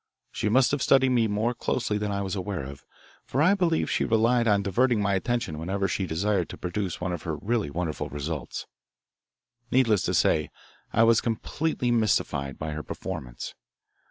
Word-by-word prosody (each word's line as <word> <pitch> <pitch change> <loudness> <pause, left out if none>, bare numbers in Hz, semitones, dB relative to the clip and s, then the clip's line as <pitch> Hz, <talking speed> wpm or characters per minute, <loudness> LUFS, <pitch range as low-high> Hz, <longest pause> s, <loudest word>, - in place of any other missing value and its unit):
She 105 - -1
must 130 +4 +4
have 145 -1 0
studied 130 -1 +4
me 120 -3 +3
more 110 +4 0
closely 115 -3 -1
than 105 0 -2
I 100 0 -1
was 95 +1 -3
aware 95 -4 -3
of, 70 +1 -9 0.4
for 130 - -3
I 170 +6 +5
believe 175 -5 +1
she - - 0
relied 115 +1 +3
on 100 -2 +3
diverting 120 +4 +2
my 100 -1 +1
attention 95 -6 -1
whenever 95 +4 -1
she 95 -1 -2
desired 90 +2 0
to - - -8
produce 90 0 -3
one 90 0 -2
of 85 - -4
her 80 -2 -3
really 110 +3 -1
wonderful 80 +1 -3
results. 75 0 -4 1.0
Needless 115 -6 +3
to - - 0
say, 75 -2 +2 0.4
I 115 - +4
was 115 -1 +5
completely 125 +3 -1
mystified 70 - +1
by 80 0 -4
her 75 0 -4
performance. - - -6
105 Hz, 180 wpm, -26 LUFS, 85-120 Hz, 1.0 s, I